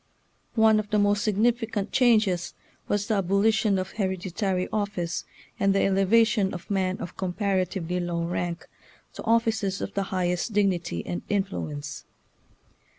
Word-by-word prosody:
One 220 -1 +5
of 210 -1 -4
the 210 - +2
most 205 0 +2
significant 220 0 0
changes 215 -8 +2 0.3
was 205 0 0
the 220 - 0
abolition 200 +2 +2
of 185 - -3
hereditary 190 -1 -1
office, 200 -5 -2 0.3
and 195 0 +3
the 195 - +3
elevation 195 +1 +3
of 175 +3 -9
men 190 -1 0
of 175 - -8
comparatively 185 -2 -1
low 175 -1 -2
rank 175 0 -3 0.5
to - - -8
offices 225 -4 +1
of - - -5
the 200 - 0
highest 180 +3 -1
dignity 190 -4 0
and 175 - -3
influence. 155 -8 -3
195 Hz, 135 wpm, -26 LUFS, 180-210 Hz, 0.5 s, One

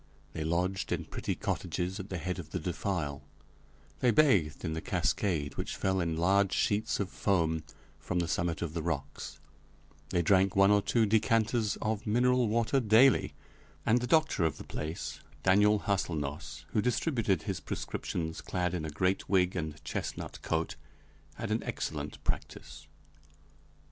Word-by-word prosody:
They 80 - -3
lodged 90 +4 -1
in - - -1
pretty - - -3
cottages 90 +3 -2
at 95 +1 -7
the 90 - -3
head 90 +2 -3
of 80 -3 -8
the 90 - -3
defile; 85 -4 -2 0.8
they 125 - +3
bathed 100 - +3
in 80 - -1
the 80 - -3
cascade, 75 -8 0
which - - -3
fell 95 0 0
in 85 -2 -1
large 95 +3 +3
sheets 105 +2 +1
of 100 -2 -2
foam 80 -5 +1 0.4
from 90 - -3
the 85 -1 +1
summit 85 0 -1
of 80 -2 -4
the 85 - -2
rocks; 75 -4 -4 0.7
they 85 - +1
drank 95 +2 +4
one 95 +1 +6
or 105 0 +5
two 115 +3 +2
decanters 110 +1 +2
of 110 0 -2
mineral 125 +2 +3
water 115 +4 +2
daily, 120 +3 +5 0.5
and 120 +2 +4
the 125 - -2
doctor 155 - +3
of 80 -3 0
the - - -8
place, 80 +3 -5 0.2
Daniel 105 +2 +5
Hâselnoss, 75 -7 -2
who 105 - +1
distributed 115 - +1
his 95 -5 -3
prescriptions 80 +2 -4
clad 90 -1 -1
in 85 -3 -2
a - - -3
great 90 +5 0
wig 95 -2 +3
and 80 -3 -4
chestnut - - -4
coat, 80 -1 -1 0.6
had - - -4
an - - +1
excellent - - -4
practice. - - -5
95 Hz, 160 wpm, -31 LUFS, 80-105 Hz, 0.8 s, one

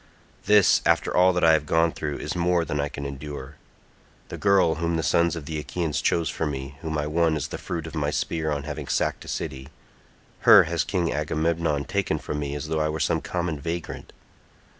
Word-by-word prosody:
This, 105 -1 +5
after - - +1
all 90 +1 +6
that 90 - -1
I 80 -1 +7
have 75 -1 +1
gone 80 0 +3
through, 75 -2 -4
is - - -4
more 85 -1 +1
than 75 - -3
I 70 0 -1
can 70 0 -7
endure. 70 -1 -7 0.7
The - - -6
girl 100 -5 +4
whom 85 0 0
the 80 - -1
sons 85 +2 +2
of 80 -4 -7
the 75 +1 -4
Achaeans 80 0 -2
chose 85 -1 +1
for 80 - -2
me, 65 -1 -5
whom 80 -2 -3
I 75 - -1
won 80 +1 +1
as 75 - -3
the - - -6
fruit 85 -2 -4
of 80 - -8
my 75 -3 -1
spear 80 +1 -2
on 70 -1 -2
having 75 -1 -6
sacked - - -1
a - - -13
city—her 65 +2 +1
has 85 +1 -1
King 90 -4 -1
Agamemnon 80 0 0
taken 100 0 -1
from 75 - -4
me 70 -1 -3
as 75 +1 -5
though 80 0 -1
I 75 - +1
were 80 +1 -3
some 70 - +1
common 85 -4 -3
vagrant. 85 +2 -5
80 Hz, 210 wpm, -25 LUFS, 75-85 Hz, 0.7 s, I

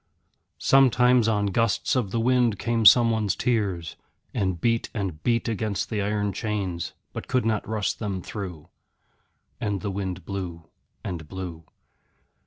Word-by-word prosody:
Sometimes 125 -3 +4
on 105 -2 +2
gusts 115 +4 +1
of 120 -6 0
the 115 - -1
wind 120 -2 +3
came 115 0 +3
someone's 110 -4 +5
tears, 100 -9 -1 0.4
and 95 -4 -1
beat 115 +4 +1
and 95 -7 -3
beat 115 -1 +1
against 110 -2 -2
the 105 -2 0
iron 105 0 -1
chains, 95 -5 -3 0.2
but - - -6
could 125 -3 +1
not 110 -2 0
rust 110 -2 -1
them 100 -4 -3
through. 90 -8 -7 0.9
And 100 -2 -2
the 100 - -2
wind 95 -3 -4
blew 90 -4 -5 0.4
and 85 -5 -5
blew. 85 -3 -7
105 Hz, 140 wpm, -25 LUFS, 95-115 Hz, 0.9 s, someone's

